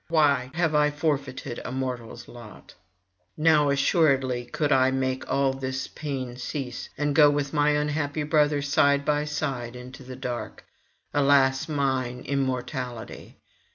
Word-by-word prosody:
why 145 -6 +2
have 165 -2 +1
I 150 0 +4
forfeited 145 -5 -3
a - - -5
mortal's 125 -3 -5
lot? 120 -3 -13 0.6
Now 150 -2 +4
assuredly 135 -4 +2
could 145 +5 -2
I 130 0 +5
make 130 0 -2
all 135 -1 +2
this 130 0 -4
pain 130 -5 -5
cease, 130 -1 -5
and 145 0 0
go 150 -1 +7
with 145 -1 -1
my 150 -1 +3
unhappy 150 0 -1
brother 150 -1 +2
side 140 0 +3
by 150 0 +1
side 125 -5 -3
into 125 +2 -10
the 130 0 -9
dark. 125 -2 -6 0.5
Alas 140 -1 +3
mine 130 -4 -1
immortality! 130 -3 -4
140 Hz, 135 wpm, -26 LUFS, 130-150 Hz, 0.6 s, go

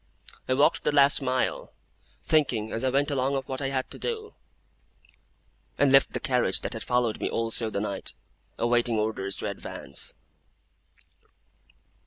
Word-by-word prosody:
I 130 - +3
walked 140 - +3
the - - +2
last 140 0 +5
mile, 130 -1 -1 0.5
thinking 125 -8 +1
as 115 - -3
I 130 - +3
went 140 +3 +1
along 135 0 0
of 135 -1 -3
what 130 +1 -4
I 135 - 0
had 130 -1 -2
to - - -9
do; 440 -2 -4 1.4
and 140 -1 +4
left 135 0 +5
the - - -1
carriage 125 -7 +1
that - - -4
had 115 - -5
followed 125 -3 0
me - - 0
all 115 0 -1
through 115 -1 -2
the 100 - -2
night, 100 -2 -3 0.4
awaiting 120 -1 +2
orders 105 -3 -1
to - - -3
advance. - - -3
130 Hz, 160 wpm, -27 LUFS, 115-140 Hz, 1.4 s, last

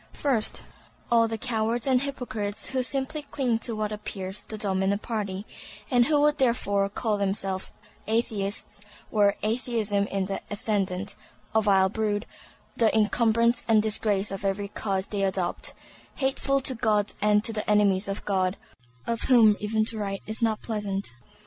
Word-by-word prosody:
First, 255 -7 0 0.5
all 230 -1 +5
the 225 0 -3
cowards 230 -1 -1
and 260 -2 +3
hypocrites 225 -7 -3
who 260 -1 +1
simply 270 +3 -1
cling 260 -5 -1
to 230 -1 0
what 215 -1 -2
appears 195 -2 -5
the 215 - -8
dominant 195 0 0
party, 205 -4 -3 0.5
and 245 -2 +5
who 300 -1 +3
would 295 0 +3
therefore 205 -6 +2
call 210 0 -1
themselves 195 -1 -2 0.4
Atheists 215 -3 -2 0.3
were 205 -2 +3
Atheism 215 -3 0
in 195 -1 -1
the 195 +1 -3
ascendant; 200 -2 -2 0.4
a 220 - +4
vile 195 -3 +4
brood, 210 +1 -1 0.5
the 225 -2 +4
incumbrance 230 +2 +3
and 220 -2 +4
disgrace 210 -2 0
of 195 0 -5
every 200 +1 -1
cause 195 -2 -2
they 205 -1 -3
adopt; 190 -2 -1 0.4
"hateful 275 0 +1
to 260 - +4
God 215 -3 +1
and 210 0 +4
to 225 - 0
the 215 -1 -3
enemies 205 -2 +3
of 195 0 -4
God"; 185 -1 +1 0.5
of 230 -1 -2
whom 225 -5 +7
even 215 +1 0
to 220 0 -2
write 195 -1 -3
is 220 +2 -5
not 220 -2 +1
pleasant. 205 -3 -2
215 Hz, 155 wpm, -26 LUFS, 200-230 Hz, 0.5 s, whom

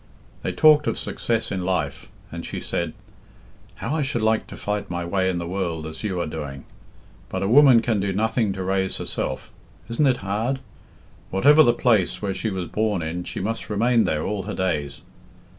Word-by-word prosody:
They - - -2
talked 155 -1 +5
of - - 0
success 115 -1 -2
in 95 - -2
life, 90 -1 -2 0.2
and - - -6
she - - -5
said - - -2 0.8
"How - - -3
I 160 - 0
should 130 -5 -1
like 110 0 +2
to - - -9
fight 105 0 -3
my 85 0 -3
way 95 +1 +1
in 90 - -1
the 85 - -3
world 85 -3 -3
as 80 +5 -7
you 95 -4 -1
are 85 - 0
doing! 75 -3 -6 0.6
But 95 +1 -2
a - - +1
woman 125 -1 +7
can 110 -3 +1
do 100 0 0
nothing 110 +2 +1
to 95 -1 -4
raise 95 0 0
herself. 65 - -4 0.4
Isn't 130 +5 +2
it 130 -2 +3
hard? 110 +7 0 0.7
Whatever 145 +11 +6
the 120 - +6
place 110 -7 +2
where 100 -2 -2
she 110 - -2
was 95 -4 -3
born 105 -1 0
in, 85 +3 -4
she - - -5
must 115 +4 -3
remain 115 +2 +3
there 75 0 0
all 105 -1 -2
her 105 +3 -5
days. 75 -7 -2
100 Hz, 195 wpm, -23 LUFS, 90-115 Hz, 0.8 s, woman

